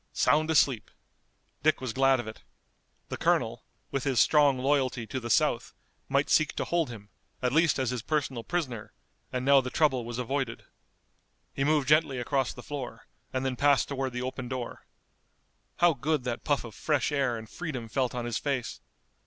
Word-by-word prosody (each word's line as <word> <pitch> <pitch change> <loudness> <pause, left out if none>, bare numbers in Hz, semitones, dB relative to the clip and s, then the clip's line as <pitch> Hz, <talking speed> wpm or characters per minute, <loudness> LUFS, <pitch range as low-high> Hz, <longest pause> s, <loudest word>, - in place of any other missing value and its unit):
Sound 155 +2 +3
asleep! 135 -8 +2 0.7
Dick 155 +1 +3
was 130 -3 -4
glad 135 0 +4
of 120 - -5
it. 110 - -9 0.7
The - - -4
colonel, - - 0 0.3
with 135 - -1
his 135 -4 +1
strong 145 -1 +5
loyalty 130 -3 +1
to 130 +5 -4
the 120 -1 -6
South, - - +1 0.3
might 140 +1 +2
seek 155 -1 +3
to - - -2
hold 170 -4 0
him, 105 -4 -10 0.3
at 125 0 0
least 165 0 +4
as 130 -3 0
his 125 -2 -3
personal 135 -3 -2
prisoner, 130 -11 -3 0.4
and 125 0 -2
now 140 0 +6
the 125 - -5
trouble 135 -5 +2
was 120 0 -6
avoided. 125 -1 -2 0.9
He 135 - -1
moved 150 -2 +2
gently 150 -2 +3
across 135 +2 0
the 125 - -11
floor, 130 -6 -6 0.3
and 130 0 -2
then 130 -1 -1
passed 140 +1 +3
toward 135 -2 -2
the 125 0 -3
open 130 -1 -4
door. 125 -1 -6 0.9
How 175 -1 +5
good 145 +1 -1
that 125 -2 -3
puff 145 -2 +1
of 115 -3 -9
fresh 150 -1 0
air 135 -5 +1
and 110 0 -9
freedom 135 -6 -5
felt 125 +2 -1
on 120 -1 -3
his 120 -2 -2
face! 135 -5 -3
130 Hz, 185 wpm, -28 LUFS, 120-145 Hz, 0.9 s, now